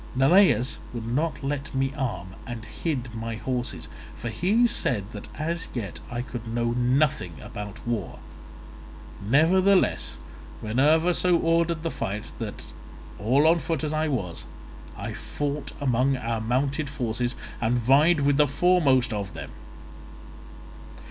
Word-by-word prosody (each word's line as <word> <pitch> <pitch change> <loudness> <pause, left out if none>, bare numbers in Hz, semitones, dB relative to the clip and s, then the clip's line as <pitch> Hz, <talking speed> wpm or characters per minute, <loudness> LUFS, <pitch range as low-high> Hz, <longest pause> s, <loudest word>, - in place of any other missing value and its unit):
Neleus 135 - +4 0.2
would 115 -1 -4
not 145 +6 -1
let 140 +1 -3
me 135 +1 0
arm, 95 -10 -3
and 115 -3 -6
hid 125 -1 -3
my 115 0 -4
horses, 125 +2 -3 0.3
for 120 - -4
he 200 - +2
said 125 - +1
that 105 -2 -8
as 165 +2 -2
yet 100 -8 -4
I 120 0 -3
could 120 -3 -7
know 115 +1 0
nothing 125 - +1
about 105 +8 -8
war; 115 -7 -2 1.1
nevertheless 180 - +3 0.4
Minerva 150 +10 +3
so 180 0 +3
ordered 165 -1 +1
the 165 - -1
fight 105 +2 -4
that, - - -5 0.5
all 130 +8 +3
on 165 +2 +5
foot 160 -3 -2
as 155 0 -1
I 155 +1 +1
was, 100 - -3 0.5
I - - -4
fought 145 -1 -4
among 130 0 +2
our 115 -2 -2
mounted 135 +5 0
forces 120 -2 -2 0.3
and 120 +2 +2
vied 140 +7 +4
with 140 0 +3
the 150 0 +5
foremost 140 -6 +3
of 100 -2 -4
them. - - -7
130 Hz, 135 wpm, -26 LUFS, 115-155 Hz, 1.1 s, on